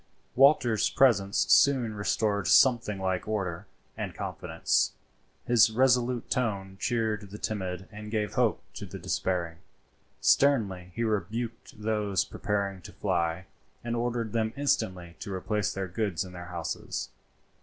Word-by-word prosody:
Walter's 125 -5 +4
presence 100 -7 +3
soon 130 -6 +4
restored 105 -1 0
something 120 -4 +4
like 95 0 -1
order 95 -6 -3 0.3
and - - -5
confidence; - - 0 0.5
his 120 -2 +5
resolute 125 0 +2
tone 100 -7 -1
cheered 110 -4 -1
the 105 - -8
timid 95 -4 -4
and 105 0 -8
gave 105 -3 -1
hope - - +1
to - - -7
the - - -8
despairing. 85 -3 -2 0.6
Sternly 100 -11 +2
he 115 - -1
rebuked 110 +2 -3
those 105 -3 0
preparing 100 -3 -2
to - - -11
fly, 85 +2 -1 0.4
and 120 0 -2
ordered 115 -2 -2
them 110 -1 0
instantly 90 -11 -1
to 100 - -6
replace 105 +2 -1
their 95 -1 -3
goods 95 -1 -2
in 90 - -11
their 85 -1 -8
houses. 85 -4 -4
105 Hz, 135 wpm, -28 LUFS, 95-115 Hz, 0.6 s, his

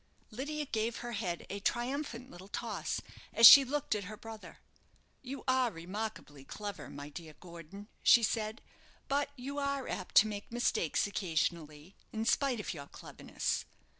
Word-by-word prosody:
Lydia 295 +6 -4
gave 225 -2 -1
her 240 - -4
head 190 -6 -3
a 200 - -4
triumphant 250 +3 -2
little 180 +2 -11
toss - - -3 0.3
as 230 - +7
she 275 +4 +13
looked 285 +1 -1
at 205 -2 -3
her 215 +3 -8
brother. 225 -1 -10 0.6
"You 270 +1 -7
are 255 -1 +3
remarkably 180 -5 -6
clever, 205 +7 -7
my 145 +1 -8
dear 155 0 -10
Gordon," 175 +3 -11
she 235 - +7
said; 220 +2 -1 0.4
"but 280 +1 0
you 275 +2 -5
are 280 -2 -1
apt 185 - -5
to 210 - +8
make 205 0 -6
mistakes 230 -9 +1
occasionally, 165 -4 -2 0.2
in 220 0 -3
spite 255 0 +2
of 210 - -4
your 140 -4 -8
cleverness. - - -4
215 Hz, 155 wpm, -33 LUFS, 180-255 Hz, 0.6 s, she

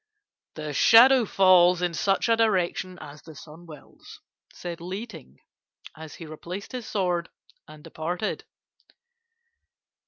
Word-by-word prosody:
"'The 150 -1 -6
shadow 245 - +6
falls 185 -2 +4
in 175 -1 -1
such 195 +5 0
a 230 - +3
direction 185 -4 -1
as 145 +1 -12
the 160 -1 -14
sun 160 +4 -14
wills,' 155 -3 -15 0.3
said 170 -1 -8
Li 190 +6 -6
Ting, 160 - -14 0.6
as 160 -1 -11
he 165 - -10
replaced 170 +5 -9
his 250 -3 -7
sword 180 -4 -2 0.4
and 150 -1 -15
departed. 170 +5 -5
175 Hz, 125 wpm, -25 LUFS, 160-195 Hz, 0.6 s, shadow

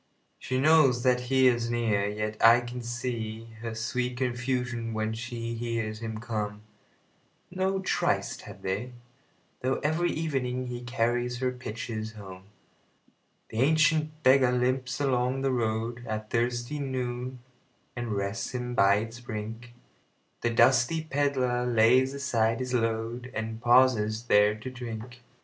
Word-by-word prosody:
She 130 0 -2
knows 140 -5 +5
that 125 -1 +3
he 130 -1 +4
is 120 -1 +2
near, 110 -4 +1
yet 105 +1 -3
I 115 +2 +8
can 120 +1 -6
seeHer 115 -2 -5
sweet 125 +2 -2
confusion 125 -2 -2
when 110 0 -1
she 115 0 -5
hears 115 -2 -3
him 110 -1 -5
come.No 110 - -5
tryst 190 - 0
had - - -12
they, 105 +7 -3 0.7
though 130 +1 +1
every 160 +4 +1
evening 130 -5 -2
heCarries 120 0 -1
her 130 0 0
pitchers 110 -2 -5
home. 95 -3 -10 1.0
The 110 - -4
ancient 155 +1 +2
beggar 130 -1 +5
limps 125 +2 0
along 130 -1 +1
the 135 0 +1
roadAt 110 -2 -2
thirsty 120 +4 -1
noon, 130 -2 -3 0.6
and 120 -3 -3
rests 100 +3 -3
him 125 0 -3
by 100 -3 +5
its 115 +3 -4
brink; 115 +1 -7 0.7
The 120 - +1
dusty 130 +6 +4
pedlar 135 -4 0
lays 125 +3 +4
aside 115 -5 +1
his 130 0 -3
load, 115 +1 -1
And 110 0 -4
pauses 120 -3 +4
there 105 -2 +4
to 130 - -6
drink. 120 0 -7
120 Hz, 125 wpm, -28 LUFS, 110-130 Hz, 1.0 s, I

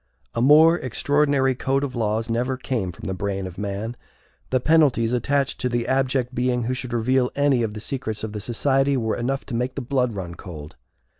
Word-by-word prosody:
A 115 - -1
more 155 +6 +6
extraordinary 140 +1 +1
code 135 +2 0
of 135 -2 -3
laws 110 0 0
never 125 +3 -1
came 115 -8 -2
from 80 - -11
the 95 - -2
brain 95 0 -3
of 95 0 -8
man. 105 +3 -3 0.5
The 130 - +2
penalties 135 -6 +3
attached 135 +3 0
to 125 - 0
the 120 -1 -1
abject 130 -1 +1
being 125 0 0
who 125 +3 -1
should 125 -1 -5
reveal 125 +2 +2
any 140 -3 +3
of 110 -2 -2
the 105 - -6
secrets 110 -4 -4
of 110 -1 -4
the 105 - -4
society 135 +4 +1
were 110 -3 0
enough 135 +3 -2
to 130 - -8
make 125 +2 -2
the 140 - -3
blood 125 -3 0
run 90 -3 -5
cold. 80 -4 -10
125 Hz, 205 wpm, -23 LUFS, 110-135 Hz, 0.5 s, more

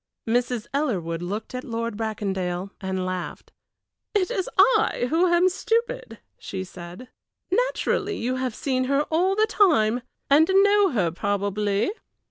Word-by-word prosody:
Mrs. 240 0 0
Ellerwood 185 - -1
looked 205 +7 -5
at 255 0 -4
Lord 230 -1 -3
Bracondale 195 -4 -3
and 190 -1 -2
laughed. 185 -1 -5 0.6
"It 370 -3 +2
is 375 - -2
I 435 - +4
who 340 +3 +3
am 345 +1 +4
stupid," 465 +6 -1 0.2
she 190 -1 -5
said. 180 +5 -10 0.4
"Naturally 415 -2 0
you 255 +2 -2
have 255 -3 -2
seen 255 -2 -1
her 280 +2 +2
all 365 +4 +2
the 430 +1 +4
time, 250 - +3 0.3
and 305 +4 +5
know 405 +1 +5
her 200 - 0
probably. 205 - -1
250 Hz, 135 wpm, -24 LUFS, -, 0.6 s, and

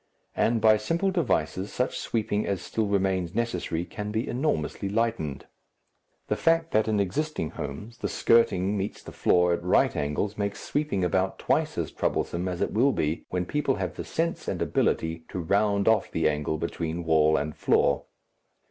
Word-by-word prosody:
And 115 0 +2
by 110 -1 +6
simple 170 - 0
devices 100 - 0
such 125 - -1
sweeping 105 -2 -1
as 100 -2 -1
still 110 +3 -2
remains 95 -2 0
necessary 90 -7 -1
can 105 +4 -6
be 110 +3 -2
enormously 105 - -1
lightened. 110 -10 -1 0.8
The - - +1
fact 165 0 +2
that 110 0 +2
in 110 -1 +1
existing 100 - -1
homes 115 +2 -7
the - - -1
skirting 105 -4 +3
meets 100 +1 -4
the - - -9
floor 90 -1 +3
at 85 - -2
right 90 - +3
angles 75 +9 -2
makes 100 0 -2
sweeping 145 -11 -1
about 95 +2 +1
twice - - 0
as - - -2
troublesome 85 +2 -1
as 90 -1 -3
it - - 0
will 130 +5 +3
be 75 +2 -1
when 90 0 -1
people 145 +3 0
have - - -3
the - - -6
sense 165 +1 -2
and - - -2
ability 80 0 0
to - - -6
round 100 +3 +1
off 110 -1 +3
the - - +1
angle 75 +1 -1
between 85 +1 -3
wall 80 -1 +4
and 75 +1 -3
floor. - - +2
100 Hz, 175 wpm, -27 LUFS, 85-115 Hz, 0.8 s, by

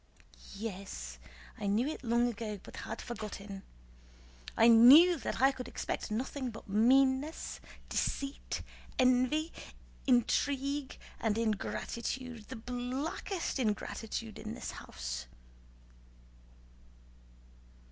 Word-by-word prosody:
"Yes, 190 - -6 0.4
I - - -2
knew 210 +5 +2
it 310 - -4
long 235 0 +3
ago 215 -3 -4
but - - -11
had - - -5
forgotten. 205 -4 -6 1.0
I 230 - +7
knew 265 +10 +9
that - - -3
I 270 +1 +6
could 255 -2 -7
expect - - -3
nothing 255 +4 -2
but 225 -1 -10
meanness, 260 +8 +3 0.3
deceit, 275 0 -2 0.3
envy, 255 +5 +3 0.5
intrigue, 275 +3 +1 0.2
and 220 -1 +1
ingratitude—the 235 +2 -3
blackest 255 - -3
ingratitude—in 220 0 -3
this 250 - -5
house..." - - -6
240 Hz, 90 wpm, -33 LUFS, 215-265 Hz, 1.0 s, knew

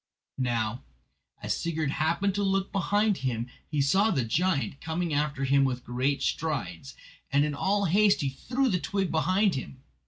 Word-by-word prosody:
Now, 120 -2 -1 0.6
as - - 0
Sigurd 160 -3 -2
happened 170 +7 0
to 205 - -1
look 195 0 0
behind 205 +1 +1
him 120 -3 -2 0.2
he 150 -3 +1
saw 195 +10 +3
the 135 - 0
giant 145 +2 0
coming 165 0 -2
after 145 -1 -1
him 140 +1 +3
with 125 -2 -1
great 130 +4 -1
strides, 135 - -3 0.4
and 140 +1 +3
in 150 - -2
all 200 +7 +1
haste 200 +3 +4
he 140 - 0
threw 255 - -1
the 185 -7 +1
twig 195 0 -1
behind 185 +5 +2
him. 130 0 -6
155 Hz, 165 wpm, -28 LUFS, 135-195 Hz, 0.6 s, haste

